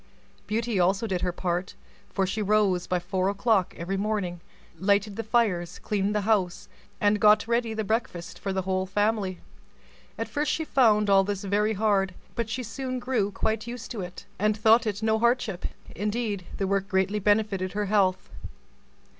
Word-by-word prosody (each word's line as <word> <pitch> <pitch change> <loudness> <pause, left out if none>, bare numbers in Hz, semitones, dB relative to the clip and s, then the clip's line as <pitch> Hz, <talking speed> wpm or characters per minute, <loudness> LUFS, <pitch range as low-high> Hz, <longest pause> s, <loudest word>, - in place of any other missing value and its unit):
Beauty 225 -1 -1
also 190 +5 +2
did 185 -5 -2
her 180 - 0
part, 180 +1 -3 0.4
for 195 - +1
she 205 +3 -2
rose 200 -3 +2
by 180 - +1
four 185 +1 -1
o'clock 200 -2 +1
every 185 +3 -3
morning, 195 -4 -2 0.4
lighted 200 +1 +2
the 225 - -2
fires, 210 -7 0
cleaned 205 0 -1
the 210 - +2
house, 195 -4 0 0.3
and 205 0 +3
got 210 +1 +5
ready 235 -1 0
the 220 - -1
breakfast 210 -5 -3
for 195 - -3
the 190 0 -1
whole 190 0 -1
family. 205 -2 0 0.8
At - - -3
first 295 0 -1
she 320 - -1
found 215 -7 +4
all 195 -1 +5
this 200 0 -3
very 210 +2 +1
hard; 195 -3 +1 0.2
but 230 -2 -2
she 255 +3 -3
soon 255 +3 -4
grew 245 -5 0
quite 220 +2 -2
used 235 -1 -7
to 220 - -4
it, 180 0 -8
and 210 +1 +2
thought 225 +2 +5
it 210 +1 -2
no 220 0 +2
hardship; 235 -6 +1 0.3
indeed, 210 -2 -2
the 195 - 0
work 195 0 0
greatly 195 +1 +1
benefited 205 -2 +1
her 210 0 -1
health. 195 -2 +2
205 Hz, 175 wpm, -27 LUFS, 190-220 Hz, 0.8 s, got